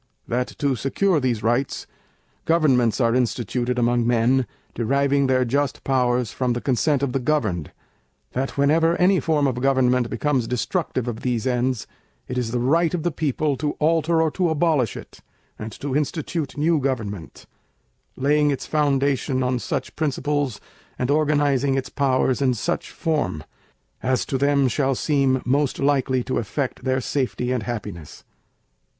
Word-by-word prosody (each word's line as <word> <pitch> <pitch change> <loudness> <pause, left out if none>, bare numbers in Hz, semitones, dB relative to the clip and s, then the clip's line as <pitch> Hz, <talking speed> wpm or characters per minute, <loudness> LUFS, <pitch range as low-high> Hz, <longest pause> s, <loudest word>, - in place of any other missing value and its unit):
—That 125 +1 -1
to 140 -2 +1
secure 155 - +1
these 120 -5 -1
rights, 120 +4 0 0.6
Governments 135 -9 +3
are 115 -2 +3
instituted 125 +1 -1
among 120 -1 +2
Men, 120 +1 +2 0.3
deriving 140 +3 +1
their 130 -1 +2
just 140 +3 -1
powers 125 -3 +1
from 125 -2 -1
the 120 - -2
consent 140 +3 +1
of 140 - 0
the 135 - +1
governed,—That 110 - -4
whenever 160 +4 +3
any 185 +1 +4
Form 150 -3 +1
of 125 -2 -1
Government 125 -2 +2
becomes 130 -1 0
destructive 125 +1 -2
of 115 -2 -3
these 120 -4 -1
ends, 125 -1 0 0.4
it 125 - -4
is 125 -2 -1
the 125 - -1
Right 160 +7 +2
of 165 - -3
the 175 - 0
People 150 -1 -1
to 150 +1 -1
alter 160 +1 +2
or 160 - +1
to 180 0 0
abolish 155 - +1
it, - - -11 0.4
and 110 +1 -6
to 135 +3 -4
institute 150 0 -2
new 160 +2 +2
Government, 110 - -4 0.7
laying 145 +2 +2
its 140 -3 -2
foundation 140 -3 +1
on 125 0 0
such 130 +2 -4
principles 145 -5 -1 0.4
and 125 +2 0
organizing 145 -3 +2
its 135 -1 -2
powers 130 -1 +1
in 130 -2 +2
such 170 +11 -2
form, 120 - -2 0.6
as 130 -1 0
to 135 - -2
them 140 -1 +3
shall 135 +2 +1
seem 135 -2 +1
most 140 +2 +1
likely 135 -3 +1
to 130 - -1
effect 125 +4 -3
their 130 0 +1
Safety 125 -1 -2
and 125 -2 0
Happiness. 105 -9 -6
130 Hz, 155 wpm, -23 LUFS, 125-145 Hz, 0.7 s, any